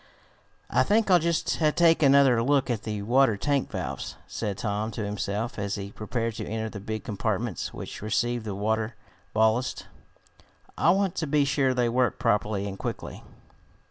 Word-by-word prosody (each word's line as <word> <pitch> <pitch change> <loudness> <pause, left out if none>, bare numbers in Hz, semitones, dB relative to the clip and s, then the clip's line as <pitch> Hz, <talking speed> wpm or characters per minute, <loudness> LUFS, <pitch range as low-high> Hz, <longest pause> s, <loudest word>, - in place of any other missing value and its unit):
"I - - +4
think 215 -1 +2
I'll 180 - +7
just 170 0 0 0.2
take 165 -1 +5
another 135 -4 +5
look 135 +1 +2
at 115 -3 -2
the 105 -2 -4
water 120 0 +3
tank 140 +4 0
valves," - - -5
said 105 -4 -4
Tom 105 0 -2
to 105 0 -3
himself 105 +3 -3
as 100 0 -2
he 100 -1 -6
prepared 115 +2 -3
to - - -4
enter 110 0 -3
the 100 - -7
big 110 +1 -5
compartments 105 -3 -2
which - - -8
received 120 +3 0
the 105 -2 -4
water 110 +2 -1 0.4
ballast. 110 +3 +1 0.9
"I - - +3
want 190 0 +2
to 160 - -1
be 145 0 +3
sure 135 -2 +1
they 125 -1 +2
work 125 +1 +1
properly 105 -4 0
and 100 -1 -7
quickly. - - -5
115 Hz, 170 wpm, -27 LUFS, 105-135 Hz, 0.9 s, I'll